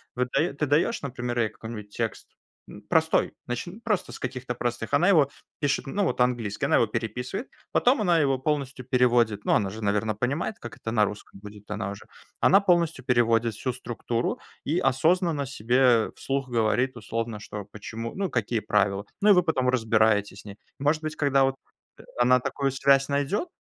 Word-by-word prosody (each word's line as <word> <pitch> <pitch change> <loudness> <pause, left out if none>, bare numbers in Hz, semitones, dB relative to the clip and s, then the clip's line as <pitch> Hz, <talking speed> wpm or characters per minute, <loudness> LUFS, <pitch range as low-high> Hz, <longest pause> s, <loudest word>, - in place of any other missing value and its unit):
вот 125 0 -1
ты - - +1
даё 160 - -1
ты 150 - 0
даёшь, 150 - +1
например, 125 -2 -3
ей 110 -2 +2
какой-нибудь 110 -2 -9
текст, 115 0 -4 0.4
м, - - -11
простой, - - +2
начни 150 - -5
просто 225 -5 -1
с - - -9
каких-то 130 -1 -4
простых. 120 +1 -3
Она 165 +6 +4
его 155 -8 +5 0.3
пишет, 145 -2 0
ну 200 +8 -1
вот 185 - -1
английский, 120 -4 0
она - - +3
его - - +4
переписывает, 120 - -4 0.2
потом 250 -1 +3
она 175 -5 +3
его 135 -3 +2
полностью 140 -2 -2
переводит. 120 -4 +2
Ну, - - +3
она 100 - +2
же, 110 +3 -8
наверное, 105 +1 0
понимает, 140 - -2
как 115 -2 -8
это 110 - -5
на 105 -2 +3
русском 100 -1 -8
будет, 105 0 -12
она 105 -1 -3
уже. 100 - -9 0.4
Она 195 - +6
полностью 170 -8 +1
переводит 115 -2 +2
всю 130 +5 -3
структуру 120 -1 -3 0.3
и 155 +4 0
осознанно 160 +2 +2
себе 125 -1 +2
вслух 135 -1 -2
говорит 120 +2 +1
условно, 115 0 -4
что, 105 0 -7
почему, 115 +2 -6
ну, 195 -1 -1
какие 115 -2 -1
правила. 100 -1 +1 0.2
Ну, 210 - +4
и - - +9
вы 180 -2 +4
потом 130 -7 +1
разбираете 110 -4 +2
с 100 - -12
ней. 100 -1 -10 0.2
Может 150 +3 +1
быть, 155 0 -3
когда 140 -2 +3
вот, 135 0 0 0.4
э, - - -12 0.2
она 125 +1 +4
такую 140 +2 -1
связь 135 0 +3
найдёт, 145 - -1
125 Hz, 190 wpm, -26 LUFS, 110-140 Hz, 0.4 s, и